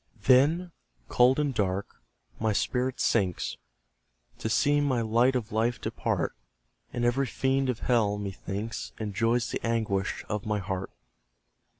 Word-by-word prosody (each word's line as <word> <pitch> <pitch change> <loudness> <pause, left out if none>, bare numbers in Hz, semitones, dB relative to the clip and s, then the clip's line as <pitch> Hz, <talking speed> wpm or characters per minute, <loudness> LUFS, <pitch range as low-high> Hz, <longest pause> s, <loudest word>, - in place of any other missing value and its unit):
Then, 150 +9 +4 0.4
cold 125 +3 +4
and 145 -2 0
dark, 100 -3 -2 0.4
my 110 -1 +1
spirit 125 +5 0
sinks, 95 -6 0 0.8
To 110 - -2
see 145 +5 +3
my 130 -5 +1
light 120 +4 +3
of 115 -3 -2
life 115 +2 0
depart; - - -2 0.6
And 120 0 -1
every 130 +3 +2
fiend 135 +2 0
of 120 -3 -2
Hell, 110 -5 +2
methinks, 100 +2 -5
Enjoys 115 +3 0
the - - -3
anguish 110 -4 -1
of 105 -1 -3
my 105 -1 +1
heart. 95 -1 -3
115 Hz, 130 wpm, -28 LUFS, 105-130 Hz, 0.8 s, Then